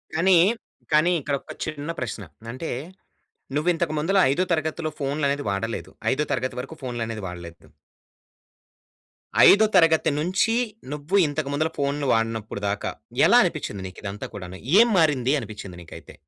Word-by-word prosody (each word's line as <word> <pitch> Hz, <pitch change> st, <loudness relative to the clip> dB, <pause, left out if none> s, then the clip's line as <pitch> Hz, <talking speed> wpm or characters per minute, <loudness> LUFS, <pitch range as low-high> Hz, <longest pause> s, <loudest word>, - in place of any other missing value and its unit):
కానీ, 185 Hz, +3 st, +4 dB, 0.6 s
కానీ, 155 Hz, +3 st, +4 dB
ఇక్కడ 140 Hz, 0 st, -1 dB
ఒక -, -, -10 dB
చిన్న 155 Hz, 0 st, -4 dB
ప్రశ్న. 115 Hz, -4 st, -4 dB, 0.3 s
అంటే 130 Hz, +7 st, -5 dB, 0.9 s
నువ్వు 155 Hz, +4 st, +1 dB
ఇంతకు 165 Hz, -2 st, -1 dB
ముందల 185 Hz, +6 st, +1 dB
ఐదో 175 Hz, +7 st, +1 dB
తరగతిలో 160 Hz, 0 st, -1 dB
ఫోన్‌లు 140 Hz, +1 st, -1 dB
అనేది 145 Hz, +1 st, -1 dB
వాడలేదు. 100 Hz, +4 st, -3 dB, 0.2 s
ఐదో 150 Hz, -, 0 dB
తరగతి 130 Hz, 0 st, -1 dB
వరకు 140 Hz, +5 st, -10 dB
ఫోన్‌లనేది 115 Hz, -4 st, -4 dB
వాడలేదు. 85 Hz, -1 st, -10 dB, 1.8 s
ఐదో 210 Hz, +2 st, +6 dB
తరగతి 165 Hz, -3 st, +5 dB
నుంచి 185 Hz, +7 st, +1 dB, 0.4 s
నువ్వు 150 Hz, +5 st, -3 dB
ఇంతకు 145 Hz, -1 st, -3 dB
ముందల 155 Hz, +3 st, 0 dB
ఫోన్‌లు 140 Hz, 0 st, -1 dB
వాడనప్పుడు 115 Hz, -2 st, -2 dB
దాకా 105 Hz, +1 st, -2 dB, 0.4 s
ఎలా -, -, +7 dB
అనిపిచ్చింది 100 Hz, -, -3 dB
నీకు 95 Hz, -, -12 dB
ఇదంతా 100 Hz, 0 st, -5 dB
కూడాను? 95 Hz, -1 st, -8 dB, 0.2 s
ఏం 235 Hz, -, +7 dB
మారింది 140 Hz, -6 st, +3 dB
అనిపిచ్చింది 100 Hz, -6 st, -8 dB
నీకైతే? 85 Hz, -, -12 dB
140 Hz, 140 wpm, -24 LUFS, 115-160 Hz, 1.8 s, ఎలా